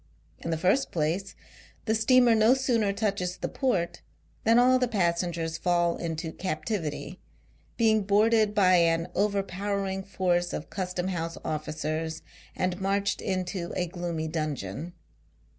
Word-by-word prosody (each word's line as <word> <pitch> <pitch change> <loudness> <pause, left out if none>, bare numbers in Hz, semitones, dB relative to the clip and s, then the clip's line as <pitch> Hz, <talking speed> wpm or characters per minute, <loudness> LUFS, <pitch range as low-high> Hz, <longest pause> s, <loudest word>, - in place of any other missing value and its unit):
In - - -5
the 165 - 0
first 190 +11 +2
place, 170 +5 -1 0.5
the 220 - +1
steamer 240 +2 +5
no 220 +3 +5
sooner 235 -6 +1
touches 195 -3 -1
the - - -3
port, 200 -11 -1 0.4
than 230 +1 +5
all 255 +1 +5
the 250 - +2
passengers 170 -5 -1
fall 175 -1 +2
into 160 -1 -4
captivity: 180 0 -4 0.6
being 220 -2 +4
boarded 210 +1 +3
by 185 -3 +5
an 165 0 +2
over 200 -1 +1
powering 195 0 -2
force 180 -2 0
of 150 - -5
Custom 185 -1 -2
house 165 -2 -3
oificers, 155 +1 -3 0.3
and 185 0 0
inarched 200 +1 0
into 185 -2 -3
a 180 - 0
gloomy 170 -2 -4
dungeon. 155 - -4
185 Hz, 135 wpm, -27 LUFS, 165-205 Hz, 0.6 s, steamer